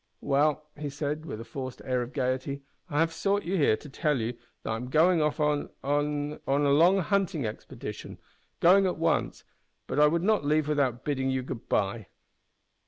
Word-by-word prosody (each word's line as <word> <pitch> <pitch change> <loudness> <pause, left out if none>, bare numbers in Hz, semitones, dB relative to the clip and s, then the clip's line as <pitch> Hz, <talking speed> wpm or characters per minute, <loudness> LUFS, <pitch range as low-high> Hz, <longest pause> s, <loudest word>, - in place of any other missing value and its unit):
"Well," 145 +2 +2
he 150 -1 -5
said, 150 +3 -4
with 110 - -5
a - - -6
forced 130 -1 -6
air 125 -1 0
of 120 +1 -5
gaiety, 130 +1 -2 0.3
"I 150 -1 +1
have 165 0 +1
sought 200 +4 0
you 185 +3 -2
here 140 - +3
to - - -12
tell 145 0 0
you 115 +2 -2 0.3
that - - -3
I - - 0
am 125 +3 -5
going 165 +4 +4
off 150 +1 0
on 150 -1 +1
on 145 +1 -1
a 135 - +2
long 170 +7 +5
hunting 190 - 0
expedition. 105 - -7 0.4
Going 190 +3 +6
at 180 - -2
once 165 -1 0 0.4
but - - -2
I 150 - +7
would 170 +3 +1
not 215 -4 +2
leave 150 +1 +2
without 135 -5 0
bidding 135 -2 0
you 130 -1 -1
good 125 -2 -7
bye." 100 0 0
145 Hz, 190 wpm, -28 LUFS, 130-160 Hz, 0.4 s, I